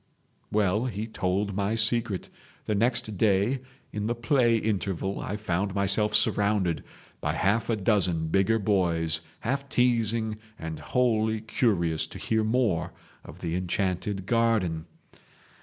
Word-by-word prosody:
"Well, 105 +2 +1
he 110 -3 -3
told 100 -1 -1
my 100 +3 0
secret. 110 -3 +1 0.3
The 105 - -1
next 110 -1 +1
day 110 +5 +2 0.3
in 105 0 -2
the 120 - -1
play 120 -1 +2
interval 100 -3 -2
I 100 - -4
found 100 -1 -2
myself 100 +2 +2
surrounded 100 -5 +3 0.4
by - - -1
half 100 +5 +1
a 115 - +2
dozen 95 -6 +1
bigger 95 +6 +2
boys, 85 -6 +1 0.2
half 140 +3 -2
teasing 115 -3 +1 0.2
and 80 -1 -6
wholly 110 +3 +1
curious 100 -8 0
to - - -10
hear 110 -1 0
more 110 -6 0 0.3
of - - -12
the 85 -1 -3
enchanted 95 +1 -2
garden. 105 -8 +1
105 Hz, 130 wpm, -27 LUFS, 95-115 Hz, 0.4 s, surrounded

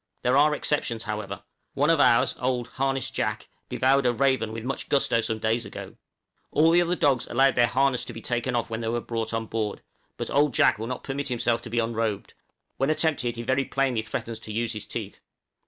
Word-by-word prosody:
There 125 +1 +3
are 150 +2 +5
exceptions, 120 -6 -1
however; 105 -3 -5 0.3
one 145 +4 +3
of 165 - +3
ours, 115 -4 +4
old 125 -1 -1
"Harness 135 -1 -1
Jack," - - -2 0.2
devoured 135 0 +3
a 120 - +3
raven 130 -3 +1
with 110 0 -6
much 135 +2 -4
gusto 135 -4 +2
some 110 0 -2
days 110 +2 0
ago. - - -9 0.6
All 160 +2 +4
the 175 +1 +5
other 175 +1 +1
dogs 140 -7 +2
allowed 135 +3 +3
their 120 -1 +4
harness 130 +1 +1
to - - -7
be - - -7
taken 120 +2 -2
off 115 -1 0
when 115 0 -4
they 115 - -3
were 120 +1 0
brought 115 -1 -3
on 115 0 -2
board; 110 -1 -3 0.3
but - - -4
old 145 -2 +2
Jack - - +4
will 110 - -4
not 125 0 -5
permit 140 +1 -3
himself 120 -2 0
to - - -9
be 120 - -3
unrobed; 115 -3 -2 0.4
when 135 - +1
attempted 155 -6 0
he 115 - -5
very 130 +3 +1
plainly 135 -4 0
threatens 110 +1 -5
to 110 - -8
use 115 +2 -1
his 105 - -6
teeth. - - -6
120 Hz, 215 wpm, -26 LUFS, 115-135 Hz, 0.6 s, are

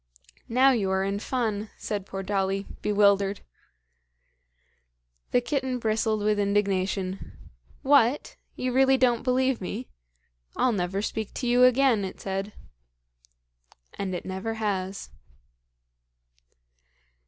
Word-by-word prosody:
"Now 260 +3 +5
you 210 -7 0
are 190 0 +1
in 200 +1 -2
fun," 220 -3 -2
said 205 -2 -4
poor 195 0 -5
Dolly, 195 0 -1 0.2
bewildered. 200 -1 +2 1.9
The 245 - +2
kitten 260 0 -1
bristled 220 -2 0
with 210 0 +2
indignation. 195 -2 -1 0.5
"What! 275 -1 +3 0.2
you 255 0 -2
really 265 +1 +4
don't 245 -2 +2
believe 260 -1 +1
me? 180 -8 -5 0.7
I'll 255 - +2
never 195 -1 -2
speak 220 -1 -4
to 250 - -3
you 245 +1 +5
again," 255 -4 +4
it 190 - -6
said. 195 +1 -4 1.4
And 190 -2 -4
it - - -6
never 190 +4 -4
has. 195 -3 -3
210 Hz, 110 wpm, -26 LUFS, 195-245 Hz, 1.9 s, Now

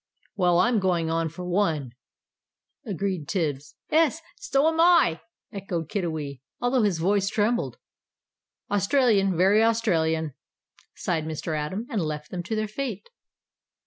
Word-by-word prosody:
"Well, 180 -3 +3
I'm 230 +4 +3
going 175 -4 0
on, 165 0 0
for 180 +3 -8
one," 165 - 0 1.0
agreed 190 -6 -2
Tibbs. 145 -7 -2 0.2
"'Es, 320 0 +3 0.2
so 305 - +1
am 325 0 0
I!" 335 - +5 0.3
echoed 175 -5 -4
Kiddiwee, 155 -8 -3 0.2
although 245 +1 +2
his 200 -5 +1
voice 195 +4 +1
trembled. 225 +3 0 0.9
"Australian 205 - +3
very 195 +4 +5
Australian!" 160 - +1 0.6
sighed 160 -3 -2
Mr. 160 0 -3
Atom, 155 +9 -3
and 230 -8 -2
left 150 -1 -4
them 180 - -3
to 220 +6 -4
their 215 0 -1
fate. 220 - -5
190 Hz, 130 wpm, -25 LUFS, 160-220 Hz, 1.0 s, I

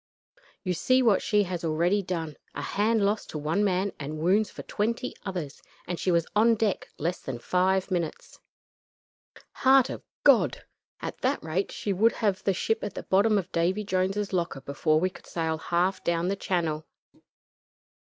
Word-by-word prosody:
You 185 -3 0
see 255 +9 +3
what 215 -5 +4
she 210 -1 +2
has 180 -2 -4
already 170 +5 +2
done 165 -5 -4 0.2
a 145 - -3
hand 210 +3 +1
lost 205 +2 -1
to - - -5
one 155 +7 0
man 190 0 +1
and 150 +2 -5
wounds 190 +7 +2
for - - -9
twenty 230 +4 -2
others 170 -7 -5 0.2
and 175 -1 -4
she - - -1
was 170 -2 +3
on 225 +2 +5
deck 220 -3 -1
less 170 +4 -2
than 130 -3 -5
five 185 +8 +1
minutes. 170 -4 -3 1.2
Heart 265 -1 +5
of - - -7 0.2
God! - - +4 0.4
At - - -5
that 265 +3 0
rate 165 +5 -1
she 200 - -2
would 220 +5 +3
have 205 -3 0
the 195 - +2
ship 220 +4 0
at 200 - -4
the - - -5
bottom 210 +3 +3
of 185 -2 -3
Davy 180 +5 +1
Jones's 195 +1 -1
locker 170 -6 -1
before 155 +3 +1
we 185 +2 0
could - - -15
sail 160 -2 -2
half 180 +3 0
down 170 +1 0
the 200 - 0
channel." 165 -5 -2
185 Hz, 175 wpm, -27 LUFS, 165-205 Hz, 1.2 s, on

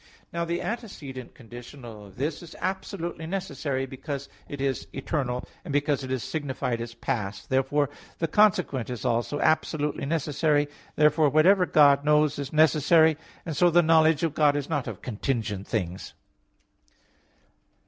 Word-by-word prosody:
Now 170 0 -1
the 170 +1 -2
antecedent 145 - -6
conditional 120 -2 -11
of 95 - -17
this 145 +4 -3
is 175 -2 -11
absolutely 180 -3 -4
necessary, 140 -7 -3
because 135 +1 -6 0.2
it 145 - -6
is 135 -1 -2
eternal, 130 -2 -2 0.2
and 175 - -7
because 145 -1 +1
it 130 - -6
is 130 -3 -1
signified 130 -4 -3
as 115 0 -7
past. 115 -4 -4
Therefore 135 +2 +2 0.3
the 165 - -1
consequent 155 - +2
is 125 0 -5
also 120 +4 0
absolutely 150 -2 0
necessary. 150 -1 +1 0.3
Therefore 150 0 +4
whatever 180 +5 +4
God 140 -2 +5
knows, 150 0 +3
is 140 -1 -5
necessary; 160 +1 +5 0.3
and 160 -3 -4
so 175 +5 +4
the 175 +1 +4
knowledge 160 -1 +4
of 165 -3 0
God 150 -2 +3
is 145 - -3
not 145 -4 -2
of - - -7
contingent 110 -4 -3
things. 95 -4 -4
145 Hz, 150 wpm, -26 LUFS, 130-160 Hz, 0.3 s, God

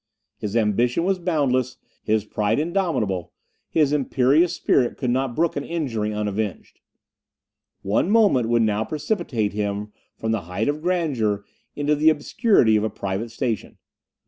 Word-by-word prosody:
His 105 +1 -4
ambition 120 +6 +2
was 190 +1 +1
boundless, 135 -8 0 0.3
his 110 -1 +1
pride 105 +1 0
indomitable, 150 - -1 0.4
his 150 -3 +2
imperious 140 +4 +3
spirit 125 -3 +1
could 125 -2 -1
not 130 -1 -1
brook 170 0 +1
an 145 - -2
injury 125 -11 -2
unavenged. 105 -1 -3 1.0
One 100 - +1
moment 200 - +4
would 120 -1 +3
now 105 0 +1
precipitate 125 - -2
him 105 0 -3 0.2
from 110 - -2
the 110 -2 0
height 90 +5 -3
of 150 +1 -2
grandeur 135 - 0 0.3
into 145 +1 +1
the 150 +2 +4
obscurity 155 - +3
of 105 - 0
a 110 - 0
private 100 +3 -4
station. 115 -2 -3
120 Hz, 145 wpm, -23 LUFS, 105-150 Hz, 1.0 s, moment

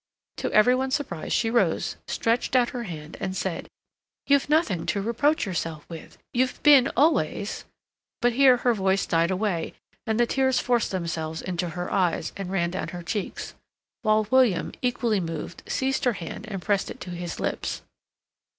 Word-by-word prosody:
To - - -2
every 215 +4 +5
one's 260 +1 0
surprise 195 - -4
she 225 -1 +1
rose, 235 - +1
stretched 230 +3 0
out 245 -2 +4
her 240 -2 -4
hand, 155 -4 -8
and 190 0 -3
said: 190 -2 -3 0.6
"You've 280 0 +3
nothing 295 - +1
to 200 - 0
reproach 235 +9 +1
yourself 165 -5 -4
with—you've 245 +9 -4
been 280 -3 +7
always—" 240 - +1 0.5
but 245 0 +2
here 260 0 +6
her 245 0 +2
voice 195 -2 +1
died 165 0 +2
away, 190 -3 -1 0.3
and 220 +1 0
the 240 - +5
tears 260 +1 +2
forced 240 -2 +1
themselves 165 -3 -3
into 180 -1 -2
her 175 +2 -5
eyes, 185 -4 0
and 195 -2 -5
ran 175 -3 0
down 185 - -3
her 175 -1 -7
cheeks, 200 +3 -4 0.5
while 215 0 +3
William, 245 -10 +3
equally 240 -4 +1
moved, 165 -1 -5
seized 265 0 0
her 245 - +3
hand 195 +4 -7
and 195 -4 -5
pressed 200 -1 +1
it - - -8
to 180 - -6
his 175 -1 -5
lips. - - -3
205 Hz, 170 wpm, -25 LUFS, 175-250 Hz, 0.6 s, been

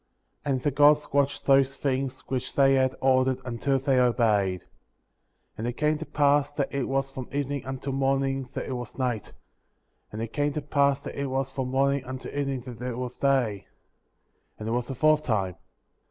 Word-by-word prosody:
18. - - +2
And 130 - -2
the 145 - +2
Gods 145 +1 +4
watched 140 0 +1
those 135 0 +4
things 135 -1 -2
which 130 -1 -4
they 135 -1 +5
had 130 -1 +2
ordered 130 -1 +3
until 125 +3 0
they 135 -1 +2
obeyed. 105 -7 +2
19. - - -27 0.9
And 115 - -2
it 120 - -2
came 150 +3 +1
to 160 - -6
pass 145 0 +2
that 140 -2 -2
it 140 -2 0
was 135 0 -1
from 130 -2 -7
evening 140 0 -2
until 135 +1 -4
morning 135 -1 0
that - - -3
it - - -4
was 120 -3 -6
night; 125 -5 -2 0.8
and 105 - -6
it 115 0 -5
came 145 0 0
to 150 - -2
pass 140 -1 +2
that 140 - -7
it 140 0 -3
was 135 0 -2
from 130 -2 -3
morning 140 +1 +1
until 130 +1 -7
evening 135 -2 -1
that 125 -2 -10
it 125 -1 -3
was 125 -1 -5
day; 125 -8 +1 0.9
and 110 - -6
it - - -1
was 120 0 -1
the 135 - -5
fourth 155 +3 +4
time. 100 - -1
135 Hz, 200 wpm, -27 LUFS, 125-140 Hz, 0.9 s, they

